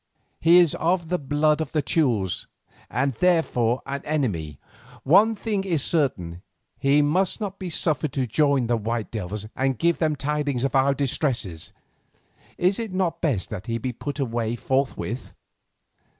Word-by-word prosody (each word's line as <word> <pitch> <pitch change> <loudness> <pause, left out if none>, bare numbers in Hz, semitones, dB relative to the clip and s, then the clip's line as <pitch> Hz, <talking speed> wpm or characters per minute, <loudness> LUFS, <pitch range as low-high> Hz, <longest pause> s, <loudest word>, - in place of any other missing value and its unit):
"He 170 +2 +6
is 175 -4 +5
of 170 0 +1
the 180 0 0
blood 150 +2 +1
of 155 - -4
the 155 -2 +1
Teules, 120 - 0 0.4
and 130 +3 0
therefore 125 -6 +1
an 140 +1 -4
enemy. 100 - -2 0.5
One 210 +9 +5
thing 205 -2 -2
is 170 -8 0
certain; 90 - 0 0.4
he 140 +2 +4
must 180 +9 +1
not 200 -2 -5
be 185 -2 -4
suffered 155 -3 0
to 135 -2 0
join 140 +1 +2
the 120 0 +1
white 115 0 -3
devils 105 -1 -4
and 135 -1 0
give 170 +5 +1
them 155 -2 +1
tidings 145 -3 -1
of 135 - 0
our 135 +1 +3
distresses. 125 - -1 0.9
Is 185 +4 +2
it 225 -3 -4
not 185 -2 -1
best 130 - -1
that 105 -2 -6
he 115 0 -1
be 125 +2 -3
put 140 +4 -5
away 115 -3 -1
forthwith?" 130 -1 -2
140 Hz, 160 wpm, -24 LUFS, 120-165 Hz, 0.9 s, He